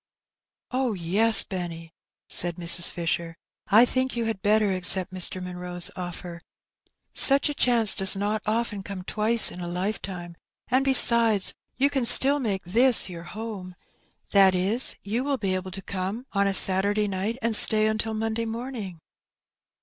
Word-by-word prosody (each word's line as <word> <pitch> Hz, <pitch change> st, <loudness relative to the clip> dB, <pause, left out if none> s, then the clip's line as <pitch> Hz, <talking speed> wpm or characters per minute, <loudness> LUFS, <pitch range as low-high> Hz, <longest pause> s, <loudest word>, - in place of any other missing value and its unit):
" -, -, -67 dB
Oh, 255 Hz, -2 st, -2 dB
yes, 200 Hz, +5 st, +2 dB
Benny," 170 Hz, -3 st, -8 dB, 0.3 s
said 175 Hz, -1 st, +1 dB
Mrs. 170 Hz, 0 st, +1 dB
Fisher, 170 Hz, 0 st, -4 dB, 0.2 s
" -, -, -68 dB
I 220 Hz, +4 st, +5 dB
think 255 Hz, +1 st, -3 dB
you 235 Hz, -1 st, -3 dB
had 225 Hz, -4 st, -5 dB
better 210 Hz, -1 st, +1 dB
accept 185 Hz, 0 st, -1 dB
Mr. 185 Hz, 0 st, +1 dB
Munroe's 180 Hz, -1 st, -6 dB
offer: 175 Hz, -1 st, -9 dB, 0.7 s
such 275 Hz, +1 st, +7 dB
a -, -, -4 dB
chance 235 Hz, -6 st, +2 dB
does 190 Hz, 0 st, +3 dB
not 205 Hz, +2 st, -3 dB
often 220 Hz, -2 st, -3 dB
come 190 Hz, -1 st, -9 dB
twice 215 Hz, +4 st, +2 dB
in 180 Hz, -, -10 dB
a 175 Hz, -, -6 dB
lifetime; 180 Hz, -1 st, -6 dB, 0.3 s
and, 260 Hz, +2 st, +1 dB
besides, 235 Hz, -6 st, +2 dB, 0.2 s
you 280 Hz, +2 st, 0 dB
can 270 Hz, -4 st, -2 dB
still 275 Hz, +4 st, +4 dB
make 200 Hz, -7 st, -4 dB
this 235 Hz, +5 st, +4 dB
your 170 Hz, -1 st, -10 dB
home 205 Hz, -4 st, -9 dB, 0.3 s
— -, -, -40 dB
that 195 Hz, -2 st, +4 dB
is, 200 Hz, +8 st, +3 dB
you 225 Hz, +5 st, -3 dB
will 280 Hz, -1 st, -2 dB
be 195 Hz, -5 st, -3 dB
able 185 Hz, 0 st, -5 dB
to 195 Hz, +1 st, -9 dB
come 200 Hz, +7 st, -6 dB
on 200 Hz, 0 st, 0 dB
a 195 Hz, -, -1 dB
Saturday 200 Hz, +3 st, +3 dB
night 200 Hz, +4 st, -4 dB
and 230 Hz, -1 st, 0 dB
stay 215 Hz, 0 st, +6 dB
until 220 Hz, 0 st, -3 dB
Monday 225 Hz, +1 st, -4 dB
morning." 225 Hz, -7 st, -8 dB
200 Hz, 165 wpm, -24 LUFS, 180-230 Hz, 0.7 s, such